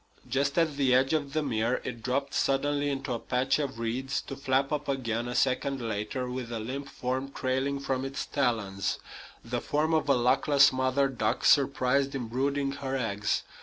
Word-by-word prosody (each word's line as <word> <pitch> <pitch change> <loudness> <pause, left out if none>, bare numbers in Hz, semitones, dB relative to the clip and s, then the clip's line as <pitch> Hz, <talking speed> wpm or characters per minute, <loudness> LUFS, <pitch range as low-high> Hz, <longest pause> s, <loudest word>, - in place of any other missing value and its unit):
Just 140 +3 0
at 160 -4 +2
the 130 -3 +4
edge 135 +3 +3
of 145 -3 -1
the 155 -1 +1
mere 120 -2 0
it 120 -2 -6
dropped 135 +3 -1
suddenly 145 +1 +1
into 135 -1 -2
a 115 - -2
patch 130 +4 0
of 135 -4 -3
reeds, 125 +4 -2
to 135 - -7
flap 135 0 0
up 150 0 -2
again, 120 -3 -1
a 125 - -4
second 135 +1 +1
later, 115 +2 -3
with 125 -1 -5
a 115 - -3
limp 135 +5 -5
form 130 +2 -3
trailing 135 +1 -1
from 135 -1 -2
its 135 +1 -4
talons 110 -8 -1 0.5
the 120 +1 -2
form 155 +2 0
of 155 -2 +1
a - - +6
luckless 135 +3 +4
mother 130 +1 +2
duck 115 -5 -1
surprised 140 0 +3
in 125 -4 -3
brooding 140 +3 0
her 135 -1 -3
eggs. 105 -4 -1
135 Hz, 185 wpm, -29 LUFS, 125-140 Hz, 0.5 s, a